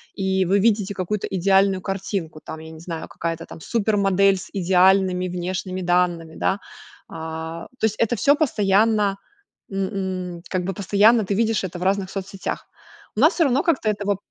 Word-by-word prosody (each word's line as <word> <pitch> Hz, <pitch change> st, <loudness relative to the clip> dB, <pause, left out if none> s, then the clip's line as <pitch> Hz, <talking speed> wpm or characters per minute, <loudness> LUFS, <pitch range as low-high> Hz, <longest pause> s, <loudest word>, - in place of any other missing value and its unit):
и 190 Hz, -1 st, +1 dB
вы 195 Hz, +3 st, +3 dB
видите 205 Hz, -2 st, +2 dB
какую-то 190 Hz, +2 st, -2 dB
идеальную 195 Hz, 0 st, +2 dB
картинку 190 Hz, -5 st, -4 dB
там, 160 Hz, -, -7 dB
я 160 Hz, 0 st, -10 dB
не 160 Hz, -, -11 dB
знаю, 165 Hz, -1 st, -6 dB
какая-то 165 Hz, 0 st, -4 dB
там 160 Hz, -, -11 dB
супермодель 195 Hz, -3 st, +2 dB
с 185 Hz, -, -9 dB
идеальными 185 Hz, 0 st, +3 dB
внешними 185 Hz, +1 st, -3 dB
данными, 175 Hz, -2 st, +1 dB
да. 195 Hz, -, 0 dB, 0.5 s
А, 160 Hz, +1 st, -6 dB
то -, -, +2 dB
есть 215 Hz, -1 st, 0 dB
это 230 Hz, +1 st, +2 dB
всё 280 Hz, +7 st, +4 dB
постоянно 210 Hz, -6 st, +2 dB, 0.5 s
н 190 Hz, -2 st, -3 dB
н 170 Hz, -, -14 dB
как 185 Hz, -1 st, -1 dB
бы 195 Hz, -, -2 dB
постоянно 205 Hz, +4 st, +4 dB
ты 200 Hz, -, -1 dB
видишь 225 Hz, -1 st, +1 dB
это 180 Hz, -1 st, -5 dB
в 180 Hz, -, -4 dB
разных 190 Hz, 0 st, +1 dB
соцсетях. 195 Hz, 0 st, -5 dB, 0.5 s
У -, -, 0 dB
нас 310 Hz, +7 st, +6 dB
всё 335 Hz, -, +2 dB
равно 270 Hz, +2 st, +2 dB
как-то 285 Hz, -10 st, +1 dB
этого 205 Hz, -1 st, -1 dB
190 Hz, 170 wpm, -22 LUFS, 180-205 Hz, 0.5 s, нас